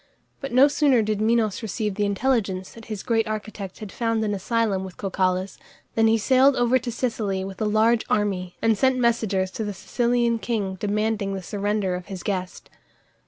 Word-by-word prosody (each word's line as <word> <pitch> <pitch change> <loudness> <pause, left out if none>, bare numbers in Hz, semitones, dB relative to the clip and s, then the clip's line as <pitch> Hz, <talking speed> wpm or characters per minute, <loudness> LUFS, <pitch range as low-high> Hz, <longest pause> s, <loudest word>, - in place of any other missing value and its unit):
But 275 - -6
no 255 +3 +6
sooner 280 -5 +3
did 210 -1 -1
Minos 220 -2 +1
receive 215 -1 -2
the 205 +1 0
intelligence 200 -4 0
that 225 -1 -13
his 215 -3 -6
great 225 -2 +1
architect 215 -3 -5
had 210 -3 -8
found 230 -2 -1
an 205 - -1
asylum 205 -1 0
with 190 -2 -9
Cocalus 185 -1 -1 0.3
than 225 0 +3
he 225 0 +4
sailed 260 +4 +4
over 245 +1 +3
to 240 - -5
Sicily 220 -5 -2
with 190 +1 -7
a - - +1
large 220 +2 +3
army, 190 -4 0
and 225 -1 +4
sent 260 +4 +2
messengers 220 -6 +1
to 220 - -4
the 205 -2 -4
Sicilian 235 +1 0
king 210 -5 -2
demanding 210 -1 -1
the 190 - -6
surrender 205 0 -1
of 180 0 -5
his 190 -3 -7
guest. 185 -3 -4
215 Hz, 185 wpm, -24 LUFS, 195-235 Hz, 0.3 s, no